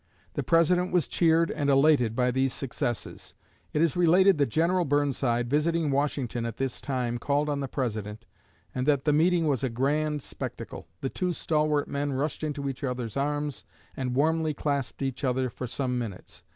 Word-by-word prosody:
The - - -1
President 175 +2 +3
was 175 -5 +2
cheered 165 0 +3
and 145 -1 -1
elated 135 -5 +4
by 125 0 +2
these 130 +1 +1
successes. 120 -3 -4 0.4
It 150 - +2
is 165 - +1
related 180 +1 +5
that 140 - +3
General 170 +8 +2
Burnside, 135 -5 +1
visiting 150 +3 +1
Washington 135 -4 -1
at 115 -1 -4
this 135 -2 -3
time, 125 -3 -2
called 145 +4 0
on 145 -1 -1
the 135 - -2
President, 110 -4 -4 0.5
and 125 +2 -2
that 140 -3 +2
"the 150 - +3
meeting 165 +2 +3
was 140 -4 0
a 130 - +1
grand 145 +4 0
spectacle. - - -7
The 135 - -1
two 180 +4 -1
stalwart 150 -3 +1
men 140 0 -2
rushed 145 +3 -2
into 145 -2 -2
each 135 +1 -5
other's 125 -4 -3
arms, 145 0 -2 0.3
and 125 -2 -2
warmly 155 +2 +1
clasped 140 -2 -2
each 135 +1 -3
other 130 -1 0
for 125 - -5
some 125 0 -2
minutes. 105 -6 -7
140 Hz, 180 wpm, -27 LUFS, 125-155 Hz, 0.5 s, related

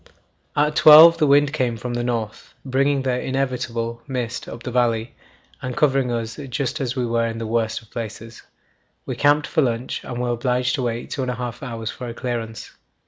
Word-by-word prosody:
At 150 +1 +2
12 160 +2 +9
the 150 - +3
wind 145 +1 +4
came 125 -6 -1
from 120 +2 -5
the 120 0 -2
north, 115 -3 -4
bringing 135 +1 +1
the 125 -1 0
inevitable 120 -3 -2
[mist] 125 -3 -4
up 115 +1 -9
the 125 - -5
valley 115 -2 0 0.5
and 125 -1 -5
covering 135 -4 +2
us 115 -1 -3
just 140 +3 -2
as 130 -1 -2
we 125 -2 -1
were 115 0 0
in 115 0 -5
the 115 - -4
worst 110 0 -1
of 110 - -23
places. 115 0 -7 0.6
We - - -4
camped 145 +1 +3
for - - +1
lunch, 120 -2 -2
and 120 -1 -6
were 125 0 -1
obliged 125 +1 0
to 130 - -1
wait 120 -1 -3
two 140 - -3
and 130 - -2
a 125 - -2
half 120 0 -6
hours 115 -4 -5
for 125 - -8
a 115 - -6
clearance. 115 -3 -5
125 Hz, 200 wpm, -22 LUFS, 115-135 Hz, 0.6 s, 12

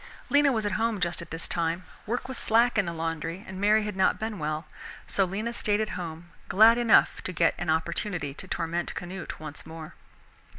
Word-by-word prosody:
Lena 285 -1 +5
was 220 -4 0
at 205 - 0
home 225 -2 +1
just 175 -1 0
at 170 - -9
this 165 +1 -4
time. 170 +1 -1 0.2
Work 245 +4 -2
was 260 - -5
slack 235 +2 +3
in 195 - +1
the - - -1
laundry 165 +2 -3
and 190 0 -7
Mary 210 +1 +4
had 210 -2 -4
not 190 - +3
been 220 -3 -4
well, 155 +1 -2 0.4
so 195 - +2
Lena 210 +6 -3
stayed 210 -2 +1
at 215 - -1
home, 170 -1 -6 0.2
glad 225 +4 +6
enough 235 -2 +4
to - - -4
get 170 -1 +3
an 175 -1 -3
opportunity 160 -1 -1
to 190 - -9
torment 170 0 -2
Canute 180 0 -6
once 150 -1 -8
more. 160 -1 -9
180 Hz, 205 wpm, -27 LUFS, 165-215 Hz, 0.4 s, glad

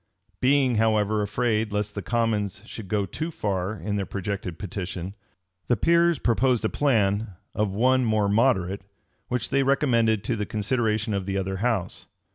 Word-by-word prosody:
[*] - - -42
Being, 130 -2 +3
however, 110 -1 +2
afraid 110 +1 0
lest 105 0 -2
the 100 - -4
commons 105 -1 -1
should 110 -3 -8
go 100 0 0
too 155 - -4
far 100 - -2
in 105 +3 -3
their 100 - -1
projected 100 -3 -4
petition, 95 -1 -5 0.5
the 120 - +2
peers 170 +5 +3
proposed 120 -1 +1
a - - +2
plan 105 -7 +1 0.2
of 105 -1 0
one 130 +4 +3
more 110 -3 +2
moderate, 100 -3 +2 0.5
which 125 -1 -2
they 135 - +3
recommended 120 -6 +2
to 120 - -1
the 105 -2 -3
consideration 110 0 0
of 100 -1 -2
the 100 0 -1
other 95 0 -2
house. 110 -3 -2
110 Hz, 165 wpm, -25 LUFS, 100-120 Hz, 0.5 s, Being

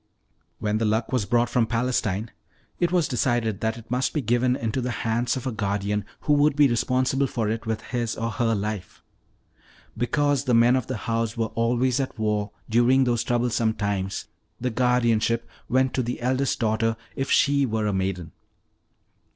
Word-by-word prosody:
"When 105 0 -1
the 115 - +1
Luck 110 +2 0
was 120 -6 0
brought 120 0 +2
from 120 -2 +1
Palestine, 115 -3 -1 0.5
it 175 -1 +1
was 175 -4 +2
decided 120 -5 0
that 110 +1 -1
it 115 0 -13
must 125 +1 0
be 150 - +1
given 120 +2 +2
into 115 0 -2
the 125 - -2 0.2
hands 120 +3 0
of 130 - -6
a 130 - -1
guardian 100 -1 -1 0.2
who 150 - +2
would 145 0 +3
be 145 -1 +6
responsible 130 +3 +1
for 115 -4 -2
it 110 +1 -3
with 110 -1 -1
his 120 -2 -2
or 115 +1 -2
her 115 -1 +1
life. 100 -3 -5 0.9
Because 140 +3 +1
the 125 -3 +3
men 120 +2 +5
of 130 -3 -1
the 130 - -3
house 115 0 -1
were 115 -1 -1
always 120 +3 +1
at 130 -2 -3
war 105 -1 0 0.2
during 120 +4 +4
those 120 -2 +1
troublesome 120 -2 +1
times, 100 -2 -2 0.3
the 125 +1 -1
guardianship 115 -1 +1 0.2
went 130 +1 +2
to 130 - +1
the 120 0 -3
eldest 130 +2 0
daughter 115 0 +1 0.2
if 135 - -2
she 140 -1 +3
were 110 -1 -1
a 105 - 0
maiden. 95 -4 -2
115 Hz, 180 wpm, -25 LUFS, 110-125 Hz, 0.9 s, be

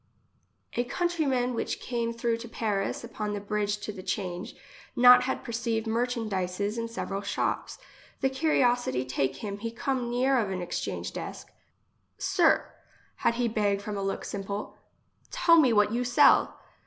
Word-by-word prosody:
A 240 - +1
countryman 270 -4 0
which 230 - -2
came 235 -2 -2
through 230 0 -1
to 235 0 -9
Paris 210 -3 -2
upon 215 -3 -4
the 205 - -2
bridge 205 0 -1
to 210 - -4
the 195 -3 -9
change, 185 +3 -4 0.4
not 250 0 +8
had 265 - -2
perceived 230 -1 -2
merchandises 215 -4 -1
in 230 - -2
several 200 -4 -4
shops. 200 - -2 0.4
The 265 - +3
curiosity 245 - +1
take 135 +1 -1
him, 200 -1 -4
he 230 +2 -3
come 250 +1 -2
near 255 +2 +2
of 210 -4 -1
a 190 -1 -3
exchange 175 -1 -4
desk: - - -7 0.2
— - - -45
" - - -47
Sir, - - +3 0.5
had 235 - +1
he 245 0 +1
beg 205 -3 +1
from 205 +1 -5
a 200 - -3
look 195 0 -3
simple, 200 +1 -5 0.5
tell 355 -10 +4
me 260 -6 +5
what 210 -1 +4
you 240 +2 0
sell." 250 - +4
230 Hz, 165 wpm, -28 LUFS, 200-245 Hz, 0.5 s, not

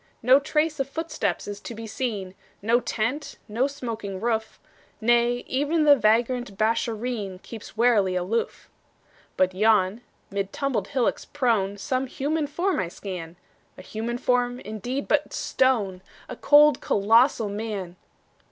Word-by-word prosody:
No 255 +3 +7
trace 300 +2 0
of 270 0 -1
footsteps 245 - -3
to 230 - -8
be 225 +1 -7
seen, 215 -5 -4 0.3
No 230 +3 +3
tent, 250 +6 -3
no 235 +6 +1
smoking 225 -8 -5
roof; 220 0 -2 0.4
Nay, 240 +1 +2
even 295 +4 +1
the 290 -1 +7
vagrant 235 -2 +1
Beeshareen 220 -2 -1
Keeps 220 -1 -10
warily 215 -6 +3
aloof. 185 +6 -2 0.7
But 185 0 +2
yon, 210 +1 +3 0.3
mid 200 0 -2
tumbled 255 -8 -1
hillocks 260 -4 0
prone, 225 -8 0
Some 260 +4 -1
human 295 +3 -1
form 355 +6 -1
I 185 - -1
scan 175 -2 -7 0.4
A - - -10
human 225 +4 -4
form, 245 0 +1
indeed, 230 +7 -4
but 300 -1 +1
stone: 210 -8 +1 0.3
A - - -7
cold, 295 0 +5
colossal 225 +2 +3
Man! 200 -4 -4
230 Hz, 135 wpm, -25 LUFS, 205-265 Hz, 0.7 s, No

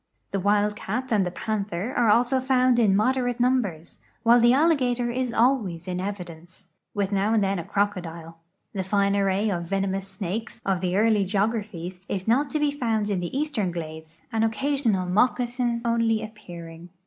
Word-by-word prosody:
The 195 - -1
wild 205 +2 +2
cat 245 +6 -4
and 200 -4 +2
the - - -1
panther 205 +3 -3
also 240 +3 +3
are - - 0
found 255 -2 +3
in 205 -4 +4
moderate 245 +3 +1
numbers, 240 -10 0 0.2
while 235 +1 +6
the 240 0 +5
alligator 255 -5 +2
is 255 0 -1
always 220 -9 +1
in 180 0 -2
evidence, 180 -2 -8 0.3
with 200 -1 -1
now 200 +3 +1
and 215 - +3
then 195 -1 0
a - - -4
crocodile. 170 -4 -3 0.3
The 195 -2 -2
fine 200 +1 +1
array 200 +1 +1
of 170 -2 -3
venomous 195 0 -1
snakes 195 +3 -5
of 190 -2 0
the 185 0 0
early 215 -1 +3
geograjfiiies 195 -3 -2
is 190 0 -3
not 270 +6 +2
to 305 - -1
be 295 -1 +2
found 225 -7 -1
in 195 - 0
the 175 +9 -4
eastern 280 -10 -1
glades, 160 -1 -8
an 225 -1 0
occasional 225 -3 +1
moccasin 240 +4 +1
only 230 -1 +1
appearing. 175 -6 -10
210 Hz, 170 wpm, -25 LUFS, 185-240 Hz, 0.3 s, while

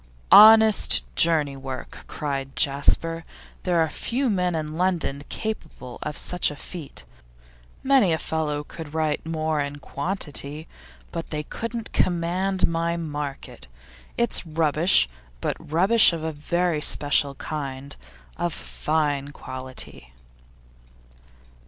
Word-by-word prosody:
'Honest 220 0 +8
journey 155 -4 +3
work!' 135 -1 -8
cried 135 -2 -4
Jasper. 160 +3 +1 0.4
'There 175 -2 +1
are 160 - +3
few 245 - -1
men 180 -3 0
in 155 -1 -3
London 170 -6 0
capable 160 - -5
of 150 - -4
such 180 -1 +1
a 150 - -7
feat. 145 - -9 0.8
Many 265 -9 +4
a 160 - +2
fellow 150 -2 -2
could 155 0 -9
write 155 -2 0
more 155 -1 -1
in 145 0 -2
quantity, 150 -1 -3 0.4
but 165 -1 -5
they 150 -1 -3
couldn't 230 +6 -5
command 180 +2 +1
my 170 0 -1
market. 145 - -5 0.5
It's 235 -1 +1
rubbish, 160 - +3 0.3
but - - -1
rubbish 190 +7 +4
of 165 -2 -4
a 160 - -2
very 165 +2 -1
special 145 -1 +2
kind, 140 -1 -5 0.4
of 175 -2 -1
fine 145 -3 -1
quality. 130 - -7
160 Hz, 115 wpm, -24 LUFS, 145-175 Hz, 0.8 s, Honest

